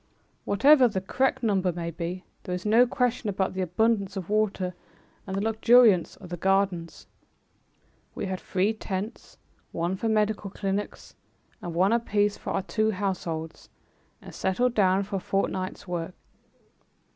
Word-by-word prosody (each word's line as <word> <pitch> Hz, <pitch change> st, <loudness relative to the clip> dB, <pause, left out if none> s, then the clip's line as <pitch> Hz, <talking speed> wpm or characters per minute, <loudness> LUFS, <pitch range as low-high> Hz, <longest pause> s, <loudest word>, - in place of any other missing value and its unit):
Whatever 260 Hz, +6 st, +6 dB
the 205 Hz, -4 st, -2 dB
correct 260 Hz, +7 st, 0 dB
number 190 Hz, -4 st, +2 dB
may 170 Hz, 0 st, -4 dB
be, 170 Hz, +3 st, -5 dB, 0.2 s
there 180 Hz, -, -4 dB
is 180 Hz, -, -7 dB
no 230 Hz, +4 st, +5 dB
question 245 Hz, -3 st, 0 dB
about 190 Hz, -1 st, -1 dB
the 190 Hz, -, -3 dB
abundance 200 Hz, +2 st, 0 dB
of 190 Hz, +1 st, -5 dB
water 200 Hz, -4 st, 0 dB, 0.5 s
and 190 Hz, -, -3 dB
the 195 Hz, -, -1 dB
luxuriance 225 Hz, -3 st, +4 dB
of 180 Hz, -, -13 dB
the 175 Hz, -, -5 dB
gardens. 190 Hz, -2 st, 0 dB, 1.1 s
We -, -, -3 dB
had 190 Hz, -1 st, -3 dB
three 195 Hz, +4 st, 0 dB
tents, 205 Hz, 0 st, -6 dB, 0.3 s
one 170 Hz, +3 st, -1 dB
for 225 Hz, +4 st, -2 dB
medical 215 Hz, -1 st, 0 dB
clinics 195 Hz, +1 st, -4 dB, 0.5 s
and 175 Hz, -1 st, -6 dB
one 190 Hz, +5 st, +3 dB
apiece 210 Hz, -3 st, +1 dB
for -, -, -8 dB
our -, -, -1 dB
two 215 Hz, +3 st, 0 dB
households, 180 Hz, -5 st, -4 dB, 0.5 s
and -, -, -11 dB
settled 240 Hz, +6 st, 0 dB
down 195 Hz, -3 st, +3 dB
for 200 Hz, 0 st, -4 dB
a -, -, -2 dB
fortnight's 190 Hz, 0 st, -2 dB
work. 175 Hz, 0 st, -4 dB
195 Hz, 150 wpm, -26 LUFS, 185-215 Hz, 1.1 s, Whatever